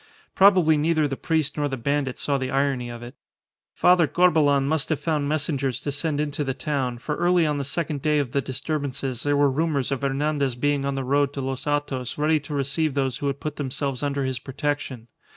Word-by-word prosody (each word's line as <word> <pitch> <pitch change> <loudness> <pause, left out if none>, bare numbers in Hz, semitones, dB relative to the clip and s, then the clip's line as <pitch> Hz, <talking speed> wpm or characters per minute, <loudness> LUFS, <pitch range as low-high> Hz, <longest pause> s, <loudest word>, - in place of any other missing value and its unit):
Probably 185 -6 +5
neither 155 0 +2
the 135 - -3
priest 155 -1 0
nor 145 -1 +1
the 135 -2 -4
bandit 135 +1 -1
saw 140 -1 0
the 130 -1 -3
irony 135 -3 0
of 120 0 -8
it. 120 +2 -9 0.6
Father 180 -3 +4
Corbelan 150 -6 +3
must 155 -1 0
have 155 - 0
found 150 -3 -1
messengers 140 -4 0
to 145 - -3
send 145 +1 -1
into 150 0 -1
the 135 -2 -2
town, 135 -6 -2
for 150 +5 -3
early 175 -1 +3
on 150 -1 0
the 140 - -2
second 150 0 -3
day 150 +1 +2
of 140 -5 -1
the 140 - +1
disturbances 135 -2 -3
there 145 0 +1
were 145 -1 +4
rumours 145 -2 0
of 135 - -1
Hernandez 140 -1 0
being 145 +2 0
on 140 0 -1
the 135 - -2
road 140 +1 +1
to 140 - -4
Los 135 0 -4
Hatos 145 -4 -2
ready 155 +1 +2
to 145 +1 -6
receive 140 +2 0
those 135 -3 0
who 140 - -3
would 140 0 -2
put 150 -1 -5
themselves 135 -1 -3
under 140 -1 -1
his 130 -2 -2
protection. 135 -3 -4
145 Hz, 215 wpm, -24 LUFS, 135-150 Hz, 0.6 s, Probably